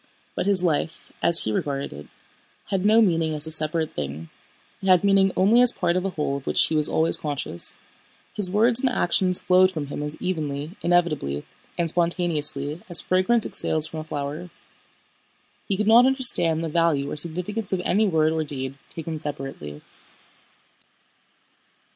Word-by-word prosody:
But - - -3
his 195 -3 +3
life, 160 -1 -3
as 170 -1 +3
he 110 - -2
regarded 140 - -3
it, 75 +1 -11 0.6
had 190 -2 -1
no 220 +2 +4
meaning 165 -5 0
as 150 0 -3
a 160 - -1
separate 155 0 -2
thing. 75 +3 -6 0.5
It 195 - -5
had 185 -1 +4
meaning 195 -1 +3
only 215 +6 +4
as 250 -1 +8
part 175 -6 -1
of 185 - -1
a - - -1
whole 150 -5 -3
of 140 - -12
which - - +2
he 160 - -2
was 150 -1 +3
always 160 +1 +1
conscious. 145 - +1 0.6
His 200 -3 +1
words 230 +5 +2
and 265 - +1
actions 185 -5 0
flowed 185 0 +3
from 155 -5 -5
him - - -5
as 150 +1 -4
evenly, 155 -4 -4
inevitably, 155 - -1 0.3
and 170 - 0
spontaneously 165 -3 -1
as 175 - +4
fragrance 195 +5 +4
exhales 155 -1 +1
from 160 - -7
a - - -6
flower. 150 +3 -6 1.2
He 195 - -1
could 210 - -1
not 235 +4 +6
understand 240 - +3
the - - -2
value 155 -4 0
or - - -4
significance 180 +7 -4
of 185 -2 -1
any 210 +5 +1
word 160 -3 +1
or 160 -1 -1
deed 135 -2 -6
taken 160 -1 -7
separately. 135 - -8
165 Hz, 170 wpm, -23 LUFS, 150-185 Hz, 1.2 s, as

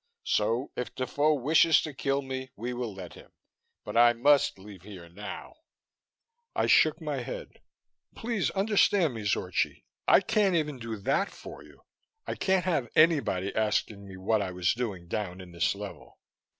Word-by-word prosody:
So 115 +5 0
if 125 -2 -5
Defoe 145 +4 +1
wishes 155 +4 +4
to 155 - -5
kill 140 +1 -1
me, 130 0 -5
we 120 +4 -4
will 120 -2 -4
let 95 -3 -9
him, - - -15 0.6
but - - -6
I 120 0 +6
must 140 +1 +3
leave 95 -1 -12
here 95 -3 -11
now." 100 - -9 1.0
I - - +1
shook - - +4
my - - -3
head. - - -7 0.5
"Please 225 -4 -1
understand 195 - +2
me, 110 -2 -6
Zorchi 105 - -1 0.2
I - - +6
can't 210 -4 +2
even 150 -5 -1
do 115 -1 -5
that 135 - 0
for - - -11
you. - - -19 0.4
I - - -3
can't 190 -2 +1
have 145 -10 0
anybody 145 - +3
asking 105 -2 -1
me 95 -1 -10
what 105 +3 +1
I 95 - -2
was 90 -1 +1
doing 105 -8 -4
down 95 0 -4
in 90 -1 -11
this 85 +3 0
level." 100 0 -9
120 Hz, 165 wpm, -28 LUFS, 100-155 Hz, 1.0 s, I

